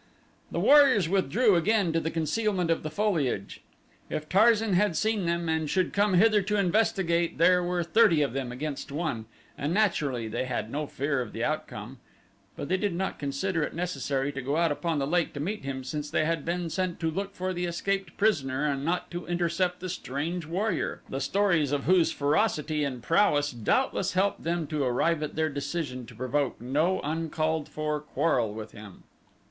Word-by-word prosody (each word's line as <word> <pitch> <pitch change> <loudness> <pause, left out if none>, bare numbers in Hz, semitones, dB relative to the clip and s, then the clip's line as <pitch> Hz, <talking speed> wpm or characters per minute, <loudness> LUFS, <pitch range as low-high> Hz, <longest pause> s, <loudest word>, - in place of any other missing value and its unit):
The - - -2
warriors 275 - +6
withdrew 195 - +3
again 195 0 +2
to 165 - +2
the 160 - -2
concealment 180 +2 0
of 165 - +1
the 155 - -4
foliage. 155 - -1 0.5
If 155 0 -4
Tarzan 220 +1 +4
had 185 -1 +2
seen 215 -4 0
them 170 0 -1
and 160 -1 0
should 185 +1 0
come 200 -1 +2
hither 210 +2 +5
to 210 +2 -1
investigate 180 -3 +1
there 180 +2 +5
were 175 0 0
thirty 170 -3 +4
of 140 - -2
them 130 -2 -3
against 140 +2 -5
one 145 -7 -3 0.3
and 150 +4 -2
naturally 145 - +1
they 110 +4 -2
had 115 -3 -3
no 150 +1 -2
fear 140 -1 -1
of 120 - -6
the - - -3
outcome, - - -4 0.6
but - - -5
they 185 - +1
did 200 -2 -1
not 190 +2 -3
consider 150 +5 -1
it 150 - -3
necessary 145 -5 -2
to 135 - -5
go 140 +4 -1
out 170 -1 +2
upon 165 +2 -1
the 140 - 0
lake 170 +3 0
to 145 - -6
meet 190 +4 -3
him 135 -1 -4
since 150 +3 -4
they 155 - +1
had 165 -2 -1
been 170 0 -2
sent 185 -1 -2
to 165 -1 0
look 200 +4 -4
for 185 +1 -2
the 180 0 -2
escaped 190 +1 -2
prisoner 145 -10 +1
and 140 -2 -1
not 175 +4 -1
to 175 0 -6
intercept 175 +1 0
the 185 - -4
strange 165 0 -4
warrior, 195 +7 -2
the 135 - -3
stories 175 -4 +2
of 145 -1 0
whose 180 +1 +4
ferocity 150 -1 +1
and 130 -4 -4
prowess 145 -4 +3
doubtless 190 - 0
helped 190 +2 +1
them 170 0 -1
to 150 -1 -2
arrive 150 +6 +1
at 150 - -4
their 160 0 +1
decision 140 -3 -4
to 120 - -13
provoke 130 +3 -1
no 150 +10 +1
uncalled 155 0 -1
for 150 0 -2
quarrel 130 -6 0
with 110 0 -7
him. 105 -3 -12
165 Hz, 190 wpm, -28 LUFS, 145-185 Hz, 0.6 s, warriors